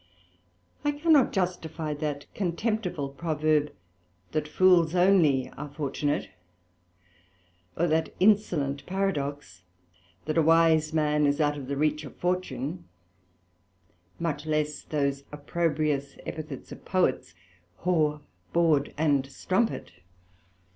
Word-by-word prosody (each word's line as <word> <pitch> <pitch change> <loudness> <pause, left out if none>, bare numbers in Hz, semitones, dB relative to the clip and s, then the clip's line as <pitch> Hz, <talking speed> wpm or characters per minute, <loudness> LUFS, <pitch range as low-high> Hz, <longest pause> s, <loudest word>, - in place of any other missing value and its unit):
I 290 - +1
cannot 295 -3 +4
justifie 165 -4 -2
that 145 -1 -4
contemptible 180 -5 -2
Proverb, 155 0 0 0.6
That 155 -1 -1
fools 175 0 +4
only 175 -8 +4
are 150 +1 -8
Fortunate; 145 0 -2 1.5
or 170 - +2
that 160 -1 +1
insolent 165 -9 +2
Paradox, 145 - -2 0.6
That 155 +1 +1
a - - +6
wise 160 -1 +4
man 150 -1 +2
is 145 +1 +1
out 145 -1 +2
of 140 -3 -7
the 140 0 -3
reach 150 +1 +1
of 140 - -10
Fortune; 180 -3 -2 1.3
much 160 -2 -3
less 150 -1 -1
those 140 -2 -1
opprobrious 150 -2 -1
epithets 155 -4 -7
of - - -10
Poets, 130 - 0 0.5
Whore, 155 -4 +1 0.3
Bawd, 160 -4 +2
and 145 -3 +2
Strumpet. 185 - -1
155 Hz, 105 wpm, -27 LUFS, 145-175 Hz, 1.5 s, a